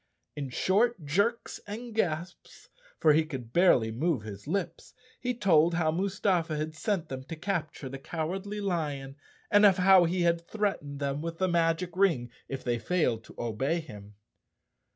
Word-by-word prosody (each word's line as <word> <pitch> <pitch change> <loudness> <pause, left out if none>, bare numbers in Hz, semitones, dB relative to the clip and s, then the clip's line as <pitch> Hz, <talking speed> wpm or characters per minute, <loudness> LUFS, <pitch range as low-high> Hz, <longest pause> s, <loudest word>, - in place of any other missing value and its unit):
In 140 -2 -4
short 195 - +1
jerks 205 +10 0
and 230 +3 -7
gasps, 175 -4 -3 0.3
for 155 -2 +5
he 160 +2 +4
could 130 -7 -7
barely 130 -11 +4
move 135 0 0
his 105 +2 -9
lips, 190 +3 -3 0.2
he 250 -1 -2
told 170 -6 +4
how 160 -2 +2
Mustafa 180 -3 0
had 155 +1 -3
sent 175 +1 -2
them 130 -3 -6
to 165 - -6
capture 160 -5 -3
the 135 +1 -7
Cowardly 180 +7 -4
Lion 145 -8 -2 0.4
and 205 +1 +6
of 200 -2 +7
how 185 -1 +6
he 175 +1 0
had 170 0 +2
threatened 170 -7 -3
them 140 0 -2
with 165 0 -5
the 185 - +1
magic 170 0 +1
ring 165 -12 +2 0.2
if 135 -1 -5
they 120 -1 0
failed 120 -4 0
to - - -15
obey 130 +8 -1
him. 105 -9 -11
165 Hz, 165 wpm, -29 LUFS, 140-190 Hz, 0.4 s, of